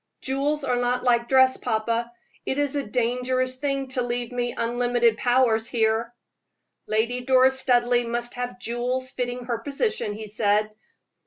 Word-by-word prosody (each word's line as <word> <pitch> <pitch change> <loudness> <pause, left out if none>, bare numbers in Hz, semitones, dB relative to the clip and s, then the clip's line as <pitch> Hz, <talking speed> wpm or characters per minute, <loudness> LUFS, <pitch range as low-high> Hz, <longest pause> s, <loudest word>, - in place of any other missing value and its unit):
"Jewels 280 +2 -1
are 250 -2 0
not 245 0 0
like 235 -1 +2
dress, 260 -1 +5
papa. 230 +2 -1 0.3
It 265 - -2
is 290 -1 0
a 285 - 0
dangerous 250 +2 0
thing 275 -1 -2
to 260 -1 -1
leave 240 0 -3
me 245 -1 -2
unlimited 240 -1 +1
powers 245 -3 +2
here." 225 0 0 0.8
"Lady 235 +3 0
Doris 260 +1 +4
Studleigh 245 -2 +2
must 240 0 -3
have 245 0 -5
jewels 250 +2 -2
fitting 245 -1 -4
her 235 -2 -2
position," 285 - -2
he 215 +1 -7
said. 210 0 +1
245 Hz, 150 wpm, -24 LUFS, 235-260 Hz, 0.8 s, dress